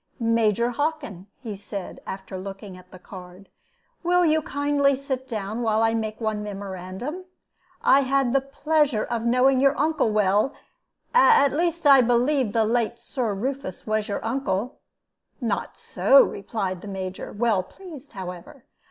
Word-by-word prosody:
"Major 230 Hz, 0 st, +2 dB
Hockin," 280 Hz, -, -3 dB, 0.2 s
he 220 Hz, -4 st, -5 dB
said, 195 Hz, -1 st, -8 dB
after 190 Hz, 0 st, -7 dB
looking 195 Hz, +1 st, -8 dB
at 180 Hz, 0 st, -15 dB
the 185 Hz, -, -12 dB
card, 185 Hz, +1 st, -12 dB, 0.5 s
"will 355 Hz, 0 st, +3 dB
you 315 Hz, 0 st, +3 dB
kindly 285 Hz, -1 st, +1 dB
sit 265 Hz, -1 st, -4 dB
down, 215 Hz, -1 st, -4 dB
while 220 Hz, -1 st, +2 dB
I 225 Hz, 0 st, +2 dB
make 220 Hz, -1 st, -3 dB
one 220 Hz, -2 st, -2 dB
memorandum? 200 Hz, -, -6 dB, 0.6 s
I 270 Hz, -, +6 dB
had 270 Hz, -2 st, +1 dB
the 275 Hz, -, +3 dB
pleasure 280 Hz, -3 st, 0 dB
of 235 Hz, -1 st, -3 dB
knowing 255 Hz, +2 st, +4 dB
your 275 Hz, +1 st, +3 dB
uncle 310 Hz, -5 st, +1 dB
well 210 Hz, +5 st, +2 dB, 0.6 s
at 460 Hz, -, +5 dB
least 335 Hz, +1 st, -1 dB
I 275 Hz, -2 st, +8 dB
believe 250 Hz, +3 st, +2 dB
that 225 Hz, +2 st, 0 dB
the -, -, +3 dB
late 235 Hz, +1 st, 0 dB
Sir 235 Hz, -6 st, -3 dB
Rufus 260 Hz, -2 st, -4 dB
was 215 Hz, 0 st, -1 dB
your 205 Hz, -, -4 dB
uncle." 245 Hz, -1 st, -2 dB, 0.6 s
"Not 230 Hz, -6 st, -3 dB
so," 275 Hz, -, +5 dB
replied 195 Hz, -3 st, -4 dB
the 210 Hz, -, -9 dB
Major, 190 Hz, -1 st, -6 dB
well 215 Hz, -3 st, +1 dB
pleased, 300 Hz, -, -13 dB
however. 185 Hz, +7 st, -9 dB
235 Hz, 150 wpm, -24 LUFS, 200-275 Hz, 0.6 s, I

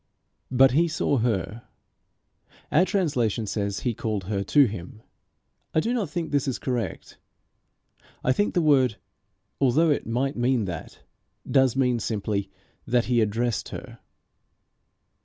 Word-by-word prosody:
But 130 Hz, +1 st, +5 dB
he 165 Hz, +6 st, +3 dB
saw 155 Hz, -3 st, 0 dB
her. 110 Hz, -1 st, -1 dB, 1.1 s
Our 165 Hz, +5 st, +5 dB
translation 130 Hz, -, 0 dB
says 100 Hz, -1 st, -2 dB
he 120 Hz, -, 0 dB
called 105 Hz, -2 st, -3 dB
her 100 Hz, +1 st, -2 dB
to 145 Hz, +6 st, +5 dB
him. 105 Hz, 0 st, -7 dB, 0.7 s
I -, -, +5 dB
do 230 Hz, +9 st, 0 dB
not 215 Hz, -9 st, -1 dB
think 165 Hz, +2 st, -4 dB
this 145 Hz, -2 st, +1 dB
is 130 Hz, -, -1 dB
correct. 120 Hz, -8 st, -4 dB, 1.0 s
I 130 Hz, -, +3 dB
think 205 Hz, +9 st, 0 dB
the 175 Hz, -, +3 dB
word, 130 Hz, -7 st, +4 dB, 0.6 s
although 145 Hz, +5 st, +3 dB
it 145 Hz, -, -1 dB
might 130 Hz, +5 st, -1 dB
mean 120 Hz, -2 st, +1 dB
that, 85 Hz, -3 st, -7 dB, 0.4 s
does 130 Hz, -3 st, +3 dB
mean 125 Hz, -3 st, +2 dB
simply 100 Hz, -2 st, -2 dB, 0.4 s
that 120 Hz, -1 st, +2 dB
he 120 Hz, -2 st, +2 dB
addressed 115 Hz, +2 st, -1 dB
her. -, -, -9 dB
125 Hz, 140 wpm, -25 LUFS, 110-145 Hz, 1.1 s, But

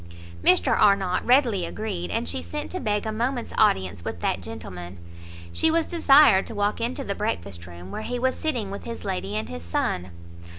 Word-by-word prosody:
Mr 185 Hz, -, +4 dB
Arnott 195 Hz, -3 st, +3 dB
readily 245 Hz, -7 st, +3 dB
agreed, 170 Hz, -, -4 dB
and 85 Hz, -, -2 dB
she 85 Hz, +1 st, -1 dB
sent 85 Hz, +1 st, -5 dB
to 370 Hz, -, -3 dB
beg 210 Hz, -, -1 dB
a 220 Hz, -, -1 dB
moment's 240 Hz, +3 st, -2 dB
audience 95 Hz, -, +2 dB
with 85 Hz, -, -5 dB
that 90 Hz, +2 st, -1 dB
gentleman. 90 Hz, -4 st, -8 dB, 0.6 s
She 320 Hz, -, +3 dB
was 325 Hz, 0 st, +2 dB
desired 280 Hz, -, +5 dB
to 225 Hz, -, -7 dB
walk 205 Hz, +2 st, 0 dB
into 250 Hz, +4 st, -2 dB
the 200 Hz, -, -2 dB
breakfast 95 Hz, -, -4 dB
room, 90 Hz, +2 st, -10 dB
where -, -, -4 dB
he 245 Hz, +3 st, -3 dB
was 260 Hz, +1 st, +1 dB
sitting 240 Hz, -11 st, -2 dB
with 200 Hz, -, -7 dB
his 230 Hz, -1 st, -6 dB
lady 95 Hz, +3 st, -3 dB
and 110 Hz, 0 st, -2 dB
his 85 Hz, 0 st, -7 dB
son. 90 Hz, +1 st, -2 dB
200 Hz, 195 wpm, -25 LUFS, -, 0.6 s, desired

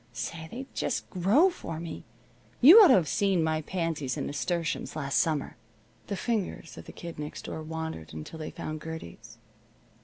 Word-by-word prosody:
Say, 160 Hz, +6 st, -5 dB
they 255 Hz, +7 st, -6 dB
just -, -, -2 dB
grow 210 Hz, -, +4 dB
for 165 Hz, -, -6 dB
me. 170 Hz, 0 st, -7 dB, 0.6 s
You 325 Hz, -, +10 dB
ought 405 Hz, -, +9 dB
to -, -, +7 dB
have 175 Hz, -5 st, +2 dB
seen 195 Hz, -2 st, +2 dB
my 160 Hz, 0 st, 0 dB
pansies 160 Hz, -6 st, -2 dB
and -, -, -2 dB
nasturtiums 165 Hz, +3 st, -2 dB
last 140 Hz, -3 st, 0 dB
summer." 155 Hz, -4 st, 0 dB, 0.5 s
The 200 Hz, -, -2 dB
fingers 210 Hz, -8 st, -3 dB
of -, -, -10 dB
the -, -, -9 dB
Kid 170 Hz, -3 st, -9 dB
Next 150 Hz, 0 st, -6 dB
Door 160 Hz, -, -5 dB
wandered 160 Hz, -, -5 dB
until 80 Hz, -, -8 dB
they 155 Hz, -, -5 dB
found 155 Hz, -1 st, -6 dB
Gertie's. 115 Hz, -, -9 dB
160 Hz, 175 wpm, -28 LUFS, 150-185 Hz, 0.6 s, You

